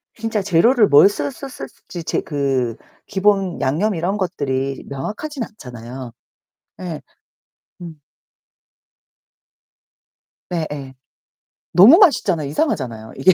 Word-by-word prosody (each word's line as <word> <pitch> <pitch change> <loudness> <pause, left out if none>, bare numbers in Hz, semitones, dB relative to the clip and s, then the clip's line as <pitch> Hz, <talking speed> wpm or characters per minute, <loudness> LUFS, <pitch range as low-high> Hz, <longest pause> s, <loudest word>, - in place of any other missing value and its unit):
진짜 225 -2 -2
재료를 205 +5 +4
뭘 145 +8 +7
썼-썼 200 - -5
썼었을지 175 -8 -9
재 - - -1
그 135 -5 -1 0.3
기본 195 -2 +1
양념 175 +10 0
이런 180 +5 -1
것들이 135 -7 -2
명확하진 230 - -5
않잖아요. 125 - -9 0.7
예. 165 -5 -5 0.8
음. 160 -4 -10 2.5
네, 170 -3 -2
예. 135 -3 -7 0.8
너무 225 - +8
맛있잖아요. 200 - +3
이상하잖아요, 125 - -2
이게. 185 +8 +5
170 Hz, 225 characters per minute, -20 LUFS, 135-205 Hz, 2.5 s, 너무